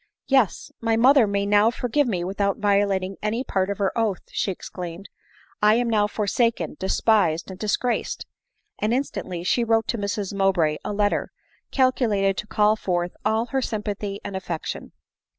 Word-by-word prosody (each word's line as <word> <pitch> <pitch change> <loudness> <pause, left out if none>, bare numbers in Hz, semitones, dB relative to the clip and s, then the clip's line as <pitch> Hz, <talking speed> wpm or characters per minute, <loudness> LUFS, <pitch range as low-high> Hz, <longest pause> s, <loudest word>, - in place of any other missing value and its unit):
" - - -69
Yes, 265 -9 +2
my 225 -1 +1
mother 255 0 +6
may 200 0 0
now 205 +2 +4
forgive 250 +4 0
me 180 -7 -1
without 200 +2 -1
violating 200 -2 +1
any 220 +4 -1
part 190 -6 -1
of 200 - -2
her 200 -2 0
oath," 220 -5 0
she - - -1
exclaimed. 180 0 -7 0.5
"I 210 +1 +5
am 240 +1 +1
now 210 -2 +3
forsaken, 210 -4 0
despised 190 -3 +2
and 185 - -10
dis 210 -1 +1
graced 245 -1 -2 0.2
!" - - -55
— 425 - -43
and 215 +3 +1
instantly 185 -10 -3
she 235 +6 +2
wrote 225 -1 +2
to 235 - -1
Mrs 200 -1 -3
Mowbray 185 -6 +2
a - - -3
letter, 205 0 0 0.4
calculated 225 -7 +2
to 210 - -4
call 215 0 +3
forth 175 -4 -2
all 220 +2 +1
her 270 - +1
sympathy 205 -3 -3
and 200 -1 -6
affec 175 -4 -4
tion. - - -5
205 Hz, 180 wpm, -24 LUFS, 195-225 Hz, 0.5 s, mother